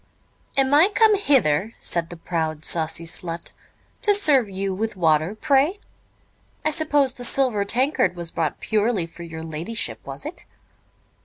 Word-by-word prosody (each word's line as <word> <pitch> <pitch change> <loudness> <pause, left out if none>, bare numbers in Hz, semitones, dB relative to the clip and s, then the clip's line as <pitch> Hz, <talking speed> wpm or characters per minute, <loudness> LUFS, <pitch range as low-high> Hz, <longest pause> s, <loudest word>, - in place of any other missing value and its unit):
"Am 270 0 +3
I 320 +7 +6
come 440 -1 +6
hither," 225 - +2
said 170 -1 -1
the 175 - -9
proud, 160 -2 -3
saucy 165 0 0
slut, 165 0 -4 0.5
"to 410 -1 +4
serve 285 - +3
you 195 0 -3
with 220 +3 -3
water, 160 +1 +2
pray? 285 - +2 0.9
I 310 - +3
suppose 295 -4 +1
the 245 - -9
silver 245 -4 +1
tankard 255 0 +1
was 170 -1 -5
brought 155 -3 -2
purely 215 -4 0
for 165 +1 -12
your 160 -1 -7
ladyship, 170 +10 -3
was - - -8
it? - - -7
210 Hz, 150 wpm, -23 LUFS, 165-270 Hz, 0.9 s, I